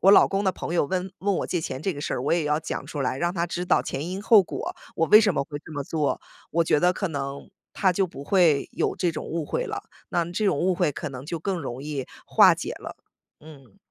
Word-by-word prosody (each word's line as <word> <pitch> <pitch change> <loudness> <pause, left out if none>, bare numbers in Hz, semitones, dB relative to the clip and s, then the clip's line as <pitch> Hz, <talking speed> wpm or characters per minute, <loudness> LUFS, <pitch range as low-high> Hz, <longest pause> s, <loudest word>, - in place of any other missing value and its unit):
我 195 - +6
老 200 - +8
公 195 +1 -1
的 190 - +2
朋 170 - -5
友 170 - +3
问 185 +4 -2
问 200 +1 0
我 - - -2
借 175 - -1
钱 135 -4 -4
这 190 - 0
个 145 - -7
事 - - -2
儿， 125 - -3
我 140 - +1
也 170 -2 +2
要 150 +1 +1
讲 160 - -5
出 145 - -5
来， 130 -1 0
让 175 +3 0
他 170 -1 0
知 175 +1 -3
道 - - +3
前 145 +5 -4
因 190 +2 -4
后 215 -1 +7
果， - - -5 0.2
我 165 - +2
为 210 +7 +9
什 205 -5 +2
么 - - +1
会 145 +1 -6
这 160 - -10
么 145 -2 -3
做。 150 0 -1 0.3
我 165 +2 +2
觉 155 - +3
得 180 +1 +4
可 195 +1 -2
能 140 -2 -5 0.2
他 190 -3 +2
就 190 +2 +1
不 140 -5 -9
会 165 -6 +3
有 - - 0
这 175 - +1
种 - - -5
误 165 -1 -3
会 - - -2
了， 415 -2 -4 0.3
那 170 - +1
这 175 +5 -1
种 170 - +2
误 185 +3 +2
会 175 -4 +1
可 155 - -5
能 130 -1 -8
就 170 +1 -3
更 185 +3 -2
容 130 -3 -5
易 145 -3 -4 0.2
化 - - +7
解 - - -5
了， - - -8 0.4
嗯。 140 -8 -15
170 Hz, 290 characters per minute, -25 LUFS, 145-185 Hz, 0.4 s, 为